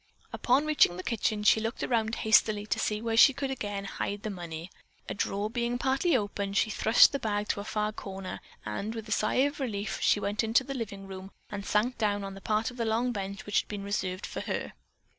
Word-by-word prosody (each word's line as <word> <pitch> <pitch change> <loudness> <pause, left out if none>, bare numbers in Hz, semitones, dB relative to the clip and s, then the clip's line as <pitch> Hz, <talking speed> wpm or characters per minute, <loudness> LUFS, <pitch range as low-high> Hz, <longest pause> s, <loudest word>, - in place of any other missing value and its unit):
Upon 265 +4 +2
reaching 300 -13 +4
the 185 - -5
kitchen 215 -2 -1
she 215 - +5
looked 225 +3 -3
around 225 -2 +1
hastily 215 -1 +3
to - - -1
see 210 +1 -1
where 225 -1 0
she 265 +4 +7
could 275 -1 -2
again 205 -6 -4
hide 200 +1 -4
the 215 - -3
money. 170 -2 -7 0.4
A - - -3
drawer 200 +1 -1
being 240 +2 -1
partly 270 +4 +2
open, 200 -2 -3
she 215 +2 +2
thrust 220 +2 +6
the 280 - -2
bag 210 -3 -2
to - - 0
a - - -4
far 210 0 -1
corner 195 -2 -6 0.3
and, 200 - -4
with 225 -1 -6
a - - -8
sigh 215 +5 +2
of 285 +1 -3
relief, 215 -5 -3
she - - +4
went 205 +2 -1
into 225 +3 +3
the 275 - -5
living 200 -6 -5
room 190 0 -8 0.2
and 200 -1 -4
sank 215 +5 0
down 205 -2 +1
on 195 0 -5
the 195 - -10
part 215 +3 0
of 245 - -13
the 235 - 0
long 230 +3 +1
bench 200 -2 -5
which 205 - +2
had - - -22
been 205 -2 -5
reserved 190 -2 -2
for - - -5
her. - - -3
215 Hz, 230 wpm, -29 LUFS, 200-235 Hz, 0.4 s, she